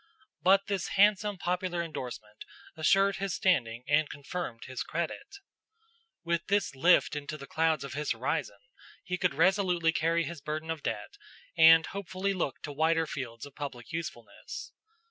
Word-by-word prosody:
But 195 +2 +5
this 195 -3 -2
handsome 205 0 +4
popular 180 -1 -1
indorsement 120 -9 -7 0.3
assured 195 +5 +3
his 195 -5 -2
standing 120 -10 +1
and 145 +1 +3
confirmed 145 -5 -6
his 130 -1 -5
credit. 170 - -4 0.9
With 170 0 -1
this 200 -4 +1
lift 165 +4 +4
in 145 -1 -5
the 155 -3 -6
clouds 160 -1 +1
of 140 - -6
his 150 0 -3
horizon, 115 -3 -2 0.5
he 180 0 -3
could 180 -2 +1
resolutely 180 -4 +3
carry 165 +1 +1
his 165 -1 -6
burden 155 +2 -4
of 160 -2 -4
debt 405 - -4 0.4
and 165 0 +8
hopefully 195 0 -3
look 175 -7 -3
to 145 - -5
wider 160 +2 +2
fields 125 -5 -6
of 145 - -13
public 135 -4 -7
usefulness. 155 -8 -6
165 Hz, 150 wpm, -30 LUFS, 145-180 Hz, 0.9 s, and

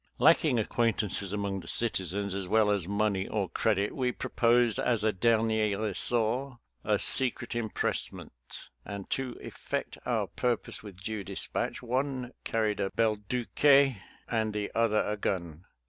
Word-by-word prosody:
Lacking 150 -1 +5
acquaintances 105 -3 0
among 100 -1 -2
the 85 - -11
citizens, 100 -3 -1
as 95 -1 -3
well 105 +1 +3
as 100 -4 0
money 100 -1 0
or 105 -3 -1
credit, 100 +3 0
we 125 -2 +1
proposed 120 -1 +2
as 115 -4 +1
a 110 - +3
dernier 110 0 +2
ressort 115 +5 0 0.3
a - - +2
secret 130 -3 0
impress 115 -3 -1
ment, - - -10 0.5
and 100 -2 -7
to 130 -2 -2
effect - - -5
our - - 0
purpose 120 -3 -2
with 100 -3 -11
due 110 -1 -3
dis - - -2
patch - - -3
one 130 0 -2
carried 110 -2 0
a 100 -1 0
belduque 110 +3 -1 0.6
and 110 -2 0
the 105 -1 -3
other 115 -2 +2
a 105 - -1
gun. 85 -4 -3
110 Hz, 145 wpm, -29 LUFS, 100-120 Hz, 0.6 s, Lacking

